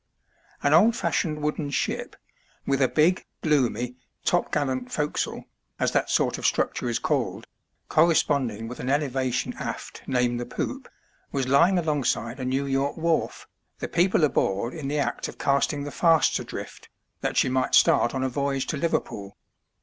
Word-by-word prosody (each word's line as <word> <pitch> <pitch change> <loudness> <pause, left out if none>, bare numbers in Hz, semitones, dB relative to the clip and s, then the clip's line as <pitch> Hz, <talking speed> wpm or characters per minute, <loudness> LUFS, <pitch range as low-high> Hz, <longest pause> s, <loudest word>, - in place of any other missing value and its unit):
An 145 - +3
old 215 +9 +6
fashioned 150 -8 -1
wooden 150 -1 -1
ship, 140 - -2 0.5
with 140 0 +1
a 130 - +5
big, 160 +7 +2 0.2
gloomy, 125 -5 +1 0.3
topgallant 130 -3 0
forecastle, 150 -1 -2 0.3
as - - +1
that - - +1
sort - - +1
of - - -5
structure 125 - 0
is 115 - 0
called, - - -1 0.4
corresponding 140 -9 +2
with 125 - -8
ah 125 - -5
elevation 135 -3 0
aft - - -6
named 125 -2 +1
the 120 - -3
poop, - - -4 0.4
was 135 -2 -1
lying 170 +8 +4
alongside 145 -6 -1
a 130 - -3
New 135 +2 0
York 135 +1 -1
wharf, 165 0 -1 0.3
the - - -4
people 175 -1 +2
aboard 115 -5 +1
in 155 -4 -5
the 145 +2 -1
act 145 - -1
of - - -10
casting 140 +1 +1
the 145 - -5
fasts 165 -1 +3
adrift, - - -8 0.3
that - - -2
she - - +4
might 130 0 +1
start 120 - +4
on 130 - -1
a - - +1
voyage 140 0 -1
to 150 - -3
Liverpool. 105 -10 -2
140 Hz, 160 wpm, -25 LUFS, 125-150 Hz, 0.5 s, old